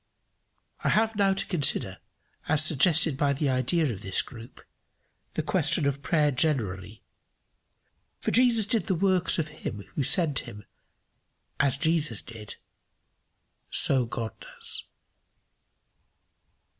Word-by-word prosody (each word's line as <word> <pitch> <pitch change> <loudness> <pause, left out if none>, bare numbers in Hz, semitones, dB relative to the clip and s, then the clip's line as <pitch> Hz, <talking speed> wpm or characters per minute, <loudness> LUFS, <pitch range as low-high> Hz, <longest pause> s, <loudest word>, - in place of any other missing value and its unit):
I - - +1
have 220 +1 +1
now 195 -1 +2
to 195 - -3
consider, 165 -7 0 0.5
as 155 0 +2
suggested 155 0 +3
by 140 -1 +1
the 140 +1 -1
idea 130 +2 0
of 95 - -10
this 95 -1 +1
group, 120 -2 -13 0.8
the - - -2
question - - 0
of 140 0 -2
prayer 150 -1 +1
generally; 110 - -2 1.2
for - - -2
Jesus 235 -3 +3
did 220 +2 -1
the 190 - 0
works 185 0 +2
of 155 -2 -2
him 110 -9 -7
who - - -2
sent 155 +1 +3
him: 105 0 -10 0.9
as 140 -2 +2
Jesus 155 -8 0
did 110 -3 -10 1.1
so 130 -3 +5
God 115 -1 -5
does. - - -4
150 Hz, 120 wpm, -26 LUFS, 120-175 Hz, 1.2 s, so